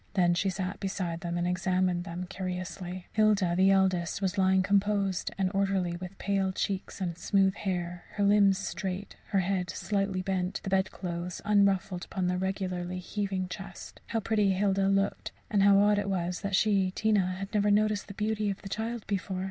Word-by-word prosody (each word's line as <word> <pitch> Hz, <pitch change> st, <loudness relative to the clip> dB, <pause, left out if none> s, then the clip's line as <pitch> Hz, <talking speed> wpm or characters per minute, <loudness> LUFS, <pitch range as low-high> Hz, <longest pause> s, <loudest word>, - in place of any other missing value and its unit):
Then 175 Hz, -3 st, +4 dB
she 190 Hz, +3 st, +1 dB
sat 185 Hz, +1 st, -3 dB
beside 180 Hz, -4 st, -3 dB
them 175 Hz, 0 st, -3 dB
and 175 Hz, 0 st, 0 dB
examined 180 Hz, -1 st, 0 dB
them 180 Hz, 0 st, -5 dB
curiously. 185 Hz, -1 st, -5 dB
Hilda, 210 Hz, -5 st, +3 dB
the 190 Hz, +2 st, +5 dB
eldest, 190 Hz, -3 st, +2 dB
was 190 Hz, -1 st, -1 dB
lying 190 Hz, -1 st, +3 dB
composed 200 Hz, -1 st, +1 dB
and 190 Hz, -1 st, +1 dB
orderly, 195 Hz, -3 st, +1 dB
with 180 Hz, +2 st, -8 dB
pale 195 Hz, -1 st, 0 dB
cheek 190 Hz, 0 st, -2 dB
and 175 Hz, -3 st, -2 dB
smooth 195 Hz, +1 st, +2 dB
hair, 175 Hz, -3 st, -3 dB
her 205 Hz, -, 0 dB
limbs 200 Hz, -1 st, +5 dB
straight, 195 Hz, 0 st, -4 dB
her 195 Hz, -, +2 dB
head 185 Hz, -1 st, -1 dB
slightly 195 Hz, 0 st, -1 dB
bent, 185 Hz, 0 st, -1 dB
the 190 Hz, -, -4 dB
bedclothes 180 Hz, -2 st, -2 dB
unruffled 195 Hz, -3 st, +2 dB
upon 190 Hz, -1 st, -3 dB
the 180 Hz, 0 st, 0 dB
regularly 185 Hz, -1 st, -2 dB
heaving 190 Hz, 0 st, -3 dB
chest. 195 Hz, 0 st, -9 dB
How 230 Hz, -, -1 dB
pretty 210 Hz, -2 st, +2 dB
Hilda 195 Hz, 0 st, +2 dB
looked, 195 Hz, 0 st, 0 dB, 0.2 s
and 205 Hz, -, +3 dB
how 200 Hz, 0 st, +6 dB
odd 205 Hz, +1 st, +4 dB
it 200 Hz, -1 st, -2 dB
was 180 Hz, -2 st, -2 dB
that 200 Hz, -1 st, -1 dB
she, 195 Hz, -2 st, +3 dB
Tina, 195 Hz, -2 st, +1 dB
had 195 Hz, +3 st, -6 dB
never 210 Hz, -1 st, +3 dB
noticed 210 Hz, 0 st, +2 dB
the 200 Hz, -, -9 dB
beauty 215 Hz, 0 st, 0 dB
of 195 Hz, -, -5 dB
the 195 Hz, -, -6 dB
child 225 Hz, +2 st, -3 dB
before! 195 Hz, -1 st, -2 dB
190 Hz, 180 wpm, -29 LUFS, 180-200 Hz, 0.2 s, how